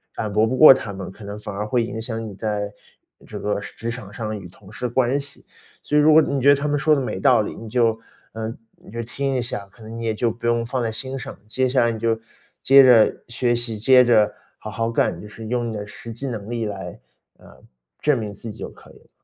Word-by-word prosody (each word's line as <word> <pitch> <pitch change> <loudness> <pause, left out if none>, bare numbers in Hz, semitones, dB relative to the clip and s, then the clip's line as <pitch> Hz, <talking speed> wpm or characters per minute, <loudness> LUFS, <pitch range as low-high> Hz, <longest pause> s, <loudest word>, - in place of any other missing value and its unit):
反 105 -2 -3
驳 110 +2 +3
不 130 - -1
过 155 -2 +10
他 115 -5 -5
们， 95 -2 -7
可 105 - -14
能 100 +1 -6
反 105 -1 -7
而 105 +2 -3
会 120 +1 +1
影 110 0 -5
响 115 0 -4
你 105 - -8
在 105 0 -3 0.6
这 - - -7
个 105 0 -1
职 115 +3 -6
场 115 -4 -8
上 110 0 -4
与 90 - -10
同 95 +4 -17
事 125 - -3
关 130 +3 +1
系。 140 0 -11 0.4
所 150 - +1
以 - - +6
如 155 +1 +6
果 160 - +8
你 140 -2 -1
觉 135 - +1
得 145 - +9
他 140 +1 -2
们 145 0 +1
说 155 +2 +3
的 140 - +2
没 125 -7 -3
道 95 - +5
理， 105 - -5
你 115 - -9
就 115 -1 +1 0.3
呃， 110 +1 -4 0.2
你 - - -16
就 115 +1 -4
听 135 +4 -3
一 130 - 0
下， 105 -4 -5
可 - - -20
能 110 +1 -8
你 115 - -5
也 110 - 0
就 115 +2 0
不 115 +1 -8
用 120 0 +2
放 125 +1 -2
在 115 - -1
心 130 +4 -5
上。 130 - -7
接 130 +2 +1
下 130 -1 +2
来 120 - +2
你 115 - -4
就 115 0 0 0.4
接 135 +1 +8
着 120 -4 +5
学 120 0 +1
习， 115 -2 -3
接 125 +3 +6
着 110 -3 +4 0.3
好 110 - -7
好 115 +3 -2
干， - - 0
就 105 - -9
是 110 +1 -9
用 120 0 -1
你 - - -5
的 105 0 -5
实 115 +2 -9
际 135 +5 -6
能 110 -5 -5
力 115 -1 -2
来， 100 -2 -6 0.4
呃， - - -18 0.4
证 150 - +2
明 105 -2 -4
自 110 +3 -8
己 - - -12
就 - - -5
可 - - -17
以 - - -18
了。 - - -27
115 Hz, 285 characters per minute, -22 LUFS, 105-125 Hz, 0.6 s, 过